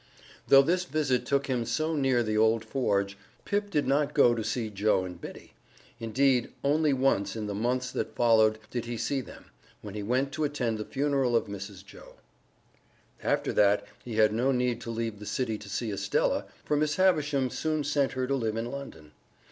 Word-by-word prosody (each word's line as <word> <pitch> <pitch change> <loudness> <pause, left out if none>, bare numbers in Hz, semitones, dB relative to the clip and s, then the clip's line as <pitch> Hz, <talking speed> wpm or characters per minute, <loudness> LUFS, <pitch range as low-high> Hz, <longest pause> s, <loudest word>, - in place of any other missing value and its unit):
Though 135 0 +8
this 180 +5 +1
visit 145 -5 0
took 140 0 +1
him 125 -3 -1
so 155 +6 -1
near 135 -4 +2
the 110 -1 -1
old 110 +1 +3
forge, 100 -5 -1 0.3
Pip 205 0 -1
did 150 -7 0
not 145 +2 +1
go 125 -5 +6
to 115 -2 -2
see 115 0 -2
Joe 100 -2 +1
and 90 -2 -9
Biddy. - - -10 0.5
Indeed, 125 +2 +1
only 150 +2 +3
once 130 -7 +1
in 110 -2 -4
the 105 - -3
months 125 +4 -1
that - - -4
followed 110 -2 +4
did 120 -2 -3
he 120 0 -4
see 135 +4 -1
them - - -14 0.3
when 105 -2 -7
he 105 - -4
went 130 +6 0
to 155 +1 -2
attend 125 -7 -1
the 105 - -4
funeral 135 -3 0
of 115 - +2
Mrs. 100 -1 -8
Joe. - - -14 1.1
After - - 0
that 100 0 +3 0.2
he 120 -3 -6
had 110 -1 +4
no 125 +5 +2
need 125 -2 0
to - - -7
leave 115 -2 -3
the 105 - -9
city 115 -5 -2
to 105 - -11
see 115 +1 -2
Estella, 100 - 0 0.2
for 150 - +1
Miss 150 0 +1
Havisham 145 -8 +2
soon 155 -1 -1
sent 145 -1 +1
her 130 0 -1
to 135 - -1
live 115 -5 -1
in 115 +2 -3
London. 80 - -9
125 Hz, 195 wpm, -28 LUFS, 110-140 Hz, 1.1 s, Though